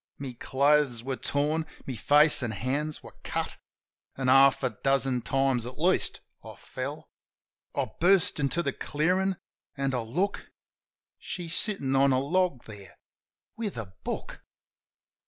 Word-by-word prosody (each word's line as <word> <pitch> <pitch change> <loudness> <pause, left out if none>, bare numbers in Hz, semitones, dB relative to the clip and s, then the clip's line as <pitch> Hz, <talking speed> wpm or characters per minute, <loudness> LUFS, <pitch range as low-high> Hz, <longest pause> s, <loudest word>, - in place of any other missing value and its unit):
My 135 -3 -6
clothes 140 -3 +2
were 135 +1 -2
torn, 150 +4 -1 0.2
my 135 - -4
face 145 +7 +4
an' 120 - -2
hands 140 +8 -2
were - - -12
cut, - - -3 0.6
An' 130 -1 0
half 135 +1 +6
a 130 - +1
dozen 135 +2 0
times, 135 -2 +1
at 125 - -9
least, 180 +5 +1 0.2
I - - -10
fell. - - -7 0.6
I - - +1
burst 180 -1 +3
into 150 +4 0
the - - -1
clearin'... 185 +5 0 0.4
an' 135 -1 -1
I 125 - 0
look.... 160 - -2 0.7
She's 170 -2 -5
sittin' 140 -11 +1
on 135 +1 +4
a 130 - +3
log 170 -1 0
there 105 -3 -12 0.6
^with 210 - -3
a 100 -5 -6
book! - - -5
140 Hz, 140 wpm, -28 LUFS, 130-160 Hz, 0.7 s, half